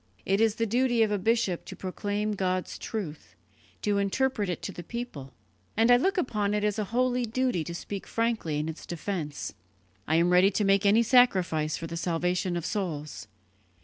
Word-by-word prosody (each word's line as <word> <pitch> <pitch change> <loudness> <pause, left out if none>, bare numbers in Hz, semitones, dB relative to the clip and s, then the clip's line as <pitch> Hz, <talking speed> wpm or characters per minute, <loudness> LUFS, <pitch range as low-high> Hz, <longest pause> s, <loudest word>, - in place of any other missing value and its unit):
It 195 +2 +2
is 225 -1 +3
the 230 - 0
duty 240 +1 +2
of 215 - 0
a 205 - +1
bishop 225 -3 +1
to - - -8
proclaim 205 +3 -2
God's 185 -2 -2
truth, 180 -9 -6 0.5
to 205 -1 +2
interpret 210 +1 0
it 175 - -4
to - - -3
the 175 - -8
people; 175 - -6 0.5
and 225 +2 +5
I 245 - +8
look 385 - +1
upon 210 - 0
it 210 - 0
as 210 0 0
a 210 - 0
holy 250 +3 +1
duty 235 -6 0
to 170 +2 -6
speak 200 +2 -6
frankly 230 -10 -1
in 150 +1 -2
its 160 0 -7
defence. 170 -4 -4 0.5
I 160 - +2
am 170 +2 +3
ready 180 +2 +6
to 205 +1 0
make 195 0 +3
any 220 +4 +5
sacrifice 185 -11 +3
for 165 - -6
the 165 +1 -5
salvation 180 +2 0
of 170 - -4
souls. 160 - -4
200 Hz, 190 wpm, -28 LUFS, 175-230 Hz, 0.5 s, I